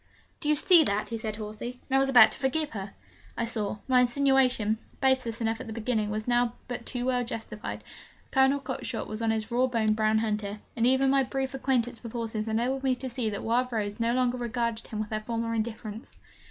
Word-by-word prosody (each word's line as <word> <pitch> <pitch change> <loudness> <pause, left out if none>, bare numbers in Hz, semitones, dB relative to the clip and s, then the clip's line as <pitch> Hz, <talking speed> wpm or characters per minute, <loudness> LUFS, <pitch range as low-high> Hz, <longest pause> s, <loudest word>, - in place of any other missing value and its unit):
'Do 295 - -2
you 300 - +5
see 335 +2 +6
that?' 205 -5 0
he 230 - -3
said 220 -1 -3
hoarsely. 215 +3 -6
'And 270 - 0
I - - +6
was 270 0 +2
about 240 -5 +8
to - - -6
forgive 285 +3 0
her!' 195 -2 -6 0.4
I 235 - 0
saw: 215 -3 -2
my 255 -1 +5
insinuation, 250 -4 +2 0.2
baseless 260 -4 +1
enough 225 0 -1
at - - -8
the 220 - -5
beginning, 220 -1 -1
was 215 +2 -3
now 240 -1 +2
but 245 -1 -5
too 245 -1 -3
well 250 -1 +1
justified. 225 -2 -6 0.5
Colonel 270 +1 +4
Cockshott 260 -3 -4
was 215 +1 -5
on 225 - +1
his 220 0 -1
raw 250 +2 +3
boned 220 -3 +1
brown 215 0 +2
hunter, 210 -2 -1 0.2
and 235 0 +2
even 265 +1 +4
my 275 0 +4
brief 265 +1 -2
acquaintance 250 -3 0
with 230 -2 -8
horses 225 -2 -3
enabled 240 +5 0
me 265 -1 +2
to 255 0 -6
see 235 -2 -1
that 205 - -5
Wild 250 +2 +1
Rose 210 -1 -2
no 230 0 +2
longer 250 0 +1
regarded 235 -1 -2
him 215 - -5
with 215 0 -4
her 215 - -1
former 230 +1 -3
indifference. 220 0 -5
235 Hz, 220 wpm, -28 LUFS, 220-255 Hz, 0.5 s, about